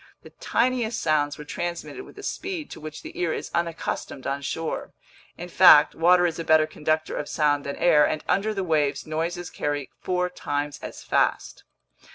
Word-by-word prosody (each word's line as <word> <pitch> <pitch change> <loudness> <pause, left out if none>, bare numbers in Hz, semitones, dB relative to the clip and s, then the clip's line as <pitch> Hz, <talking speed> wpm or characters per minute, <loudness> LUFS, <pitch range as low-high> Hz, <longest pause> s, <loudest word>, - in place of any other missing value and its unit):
The - - -13
tiniest 240 -2 0
sounds 145 -2 +1
were 150 - -8
transmitted 175 - -5
with - - -16
a - - -9
speed 365 -6 -4
to - - -8
which 155 0 -8
the - - -9
ear 175 -2 0
is - - -5
unaccustomed 165 -5 -3
on 140 +1 -2
shore. 160 +3 -4 0.4
In 175 - -7
fact, 170 -4 +7
water 175 +2 +4
is 170 -1 -1
a - - -2
better 160 -1 +5
conductor 155 +1 -2
of 145 - -4
sound 145 -2 +1
than 140 - -4
air, 155 -4 +4
and 155 - -3
under 205 +3 +1
the 195 -3 -2
waves 150 -5 0
noises 170 +3 -3
carry 145 -2 -3
four 180 -1 0
times 145 -4 -4
as - - -9
fast. - - 0
160 Hz, 185 wpm, -25 LUFS, 150-180 Hz, 0.4 s, fact